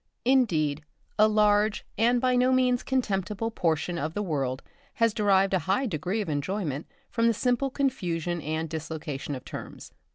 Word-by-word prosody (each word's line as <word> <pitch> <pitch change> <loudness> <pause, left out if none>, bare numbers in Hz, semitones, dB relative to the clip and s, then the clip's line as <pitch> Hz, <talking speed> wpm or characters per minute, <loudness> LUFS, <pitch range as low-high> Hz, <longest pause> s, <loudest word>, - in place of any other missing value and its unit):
Indeed, 160 - +2 0.4
a 215 - +7
large 210 0 +2
and 240 +2 +3
by 255 0 +2
no 250 +1 +3
means 255 -1 +3
contemptible 210 -3 -1
portion 170 -3 -1
of 155 +2 -3
the 205 - -1
world 135 -7 -2 0.3
have 230 -2 +2
derived 195 -3 +3
a 190 - +3
high 205 +8 +2
degree 185 - -2
of 200 - -4
enjoyment 150 0 -2 0.2
from 230 -1 +2
the 230 - +3
simple 250 +4 +1
confusion 175 - -1
and 160 +2 -2
dislocation 155 -3 -5
of 130 - -9
terms. - - -8
195 Hz, 160 wpm, -27 LUFS, 160-230 Hz, 0.4 s, a